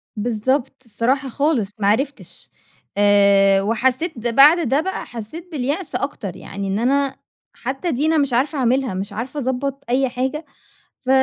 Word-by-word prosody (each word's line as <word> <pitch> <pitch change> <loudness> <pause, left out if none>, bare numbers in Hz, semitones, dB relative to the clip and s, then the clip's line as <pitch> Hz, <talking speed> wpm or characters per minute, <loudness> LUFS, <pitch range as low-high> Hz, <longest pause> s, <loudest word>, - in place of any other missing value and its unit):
بالضبط، 245 +5 -1
الصراحة 250 +5 -1
خالص، 275 -6 0
ما 200 - +1
عرفتش، 270 +7 -2 0.5
آآ 200 -1 +5
وحسيت 255 - 0
بعد 290 +7 +6
ده 275 +4 +3
بقى 380 +3 -4
حسيت 245 +10 -9
باليأس 295 +4 -3
أكتر، 205 - -4
يعني 195 0 -6
إن 195 +2 -1
أنا 270 +3 +1 0.4
حتى 270 +8 -3
دي 285 +2 0
أنا 320 0 +3
مش 280 -4 +1
عارفة 275 +5 +1
أعملها، 255 -2 +1
مش 195 +2 -5
عارفة 250 +7 -5
أضبّط 275 +1 -2
أي 260 +1 +2
حاجة. 265 +5 -3 0.5
ف 260 - -8
260 Hz, 150 wpm, -20 LUFS, 220-280 Hz, 0.5 s, بعد